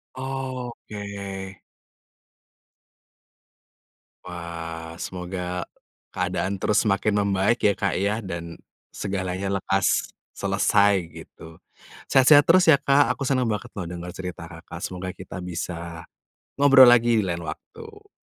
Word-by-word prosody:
Oh 130 -2 -4 0.2
oke. 100 -2 -6 2.7
Wah, 85 -2 -7
semoga 90 -1 -5 0.5
keadaan 95 +2 -1
terus 105 - +2
semakin 105 +1 +2 0.2
membaik 100 +4 +2
ya 100 - +5
Kak 100 -2 -1
ya, 100 +2 +1
dan 85 -3 -6 0.4
segalanya 95 0 -2
lekas 95 0 0 0.2
selesai 100 +1 +2 0.2
gitu. 80 0 -13 0.5
Sehat-sehat 145 +2 +6
terus 180 0 +6
ya 140 - +6
Kak, 140 +1 +3
aku 140 - -2
senang 130 -3 +1
banget 110 +3 -4
loh 100 - -4
dengar 90 0 -7
cerita 90 -3 -7
Kakak, 80 -1 -10
semoga 90 0 -6
kita 95 0 -8
bisa 85 -1 -6 0.5
ngobrol 135 -2 +8
lagi 120 -1 +5
di - - -1
lain 85 -2 -3
waktu. 425 - -10
95 Hz, 115 wpm, -24 LUFS, 90-120 Hz, 2.7 s, ngobrol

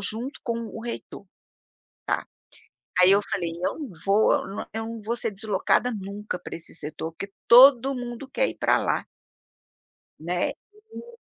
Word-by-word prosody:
junto 230 +7 -4
com 235 -1 -1
o 225 - -8
reitor, 235 -3 -6 1.7
tá. 180 - +7
Aí 185 - +7
eu 200 - +4
falei: 175 -4 -1
"Eu - - -1
não 295 - -5 0.2
vou, 200 +2 +4
eu - - -1
n - - -4
eu 225 0 -2
não 230 0 -6
vou 225 +3 -2
ser 225 - -1
deslocada 210 +4 +1
nunca 200 -1 -5
para 175 - -8
esse 165 - -8
setor, 160 +1 -5
porque 195 +4 -8 0.2
todo 265 +2 +8
mundo 245 +1 -6
quer - - +1
ir - - -7
para - - +3
lá" - - 0 1.1
né, 175 +3 -1 0.5
e 470 0 -13
220 Hz, 165 wpm, -25 LUFS, 195-245 Hz, 1.7 s, todo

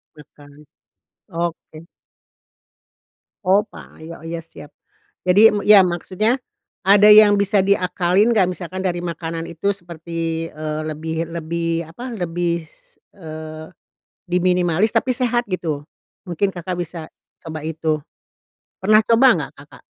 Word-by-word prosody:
Nah, 150 - -13
kan. 145 -1 -16 0.8
Oke. 170 -2 -5 1.7
Oh, 195 +3 +5
pa - - -14
yo 165 0 -10
iya 165 0 -5
siap. 160 -2 -14 0.6
Jadi 205 +5 +7
m - - 0
iya 205 -2 +7
maksudnya 190 +8 -1 0.5
ada 205 +1 +7
yang 210 -1 +8
bisa 200 0 +2
diakalin 190 +2 +2
nggak? 195 -5 +3
Misalkan 185 0 -6
dari 175 -2 -2
makanan 165 -1 -4
itu 190 +5 -2
seperti, 165 -2 -5
eee, 155 0 -5
lebih 160 +2 -4
lebih, 165 0 -2
apa, 235 +11 -9
lebih 170 -2 -2
s 150 - -27 0.2
eee, 155 -2 -8 0.6
diminimalis, 180 +1 +2
tapi 260 -2 +2
sehat 245 -1 0
gitu. 160 -6 -3 0.4
Mungkin 180 +3 0
Kakak 180 -1 -5
bisa 170 -1 -6 0.4
coba 160 -2 -6
itu. 160 -1 -2 0.8
Pernah 215 +3 +5
coba 230 +3 +5
nggak, - - -5
Kakak? - - -17
175 Hz, 125 wpm, -20 LUFS, 160-200 Hz, 1.7 s, yang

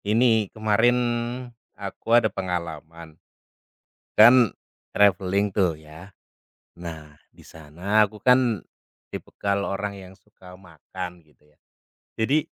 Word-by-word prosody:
Ini 110 -1 +3
kemarin, 110 +3 +2 0.8
aku 105 +4 0
ada 120 - +3
pengalaman, 85 -4 -5 0.9
kan 120 +1 +6 0.4
traveling 100 0 +2
tuh, 95 -4 +3
ya. 80 +5 -14 0.7
Nah, 80 -3 -8 0.2
di - - -20
sana 90 +8 0
aku 105 - -14
kan 125 -6 +3 0.5
tipikal 100 0 -3
orang 100 0 -4
yang 95 0 -13
suka 90 -1 -17
makan, 90 0 -9
gitu 75 0 -30
ya. 75 0 -30 0.6
Jadi, 140 +7 +2
100 Hz, 105 wpm, -24 LUFS, 85-110 Hz, 0.9 s, kan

